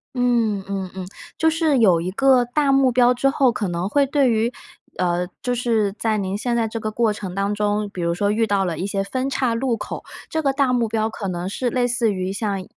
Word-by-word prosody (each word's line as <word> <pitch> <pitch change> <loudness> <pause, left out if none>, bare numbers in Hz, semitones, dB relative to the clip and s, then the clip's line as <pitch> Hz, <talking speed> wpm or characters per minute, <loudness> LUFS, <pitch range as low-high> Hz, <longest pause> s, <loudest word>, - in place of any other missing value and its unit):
嗯 235 -5 +1
嗯 195 -2 -3
嗯。 190 -1 -5 0.3
就 320 - +3
是 320 -3 +1
有 185 -7 +5
一 180 +2 -3
个 260 +3 +4
大 275 +3 +1
目 270 -1 +4
标 245 0 +4
之 275 +2 +1
后， 270 -3 +3
可 210 -3 -2
能 175 +2 -2
会 285 +4 +3
对 275 -1 +2
于， 225 +1 +1 0.5
呃， 180 0 0
就 245 0 -1
是 225 -4 +1
在 220 0 -1
您 195 0 -2
现 240 +2 -1
在 230 -1 +1
这 225 +1 -5
个 215 0 -3
过 225 0 +1
程 200 -3 -6
当 200 +2 -1
中， 210 0 0
比 180 - -6
如 170 0 0
说 200 +4 0
遇 225 +1 +2
到 200 -2 +1
了 170 -3 -3
一 185 - -3
些 195 0 -1
分 260 +6 -2
叉 255 -4 0
路 245 0 0
口， - - -6 0.3
这 320 - -1
个 275 -3 +1
大 275 -2 +2
目 235 -2 +1
标 220 0 0
可 205 -2 -5
能 180 0 -3
是 245 +5 -2
类 245 0 +1
似 235 -3 +1
于 185 0 -3
像， 200 -2 -2
225 Hz, 260 characters per minute, -22 LUFS, 195-250 Hz, 0.5 s, 有